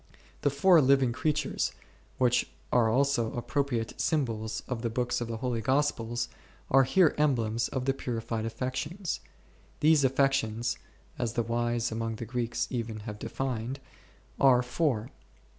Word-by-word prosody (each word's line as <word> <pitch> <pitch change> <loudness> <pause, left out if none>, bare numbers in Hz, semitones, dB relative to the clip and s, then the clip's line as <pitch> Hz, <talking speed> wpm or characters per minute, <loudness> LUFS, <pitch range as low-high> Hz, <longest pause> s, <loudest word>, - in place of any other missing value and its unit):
The 145 - +3
four 160 +5 +5
living 135 -2 +4
creatures, 150 +3 -1 0.4
which 125 -1 +2 0.2
are 120 -3 +4
also 125 -2 +2
appropriate 120 -2 -2
sym 155 -4 +2
bols 110 -2 -4
of 125 -3 -3
the 115 - -1
books 120 +1 -1
of 120 - -2
the 115 -1 -4
Holy 120 -1 -2
Gospels, 120 -2 0 0.4
are 135 0 +6
here 160 +4 +4
em 150 -3 +4
blems 115 0 -1
of 130 -1 -3
the 135 - +2
purified 115 -4 -3
affections. 130 - -3 0.6
These 155 -1 +5
affections 130 -4 +1 0.4
(as 120 -3 -1
the 120 - 0
wise 120 0 0
among 115 0 -2
the 115 - -6
Greeks 120 0 -1
even 115 -4 -3
have 105 -1 -7
defined) 130 +1 -3 0.6
are 125 -2 +6
four. 125 -3 -1
125 Hz, 145 wpm, -29 LUFS, 115-135 Hz, 0.6 s, are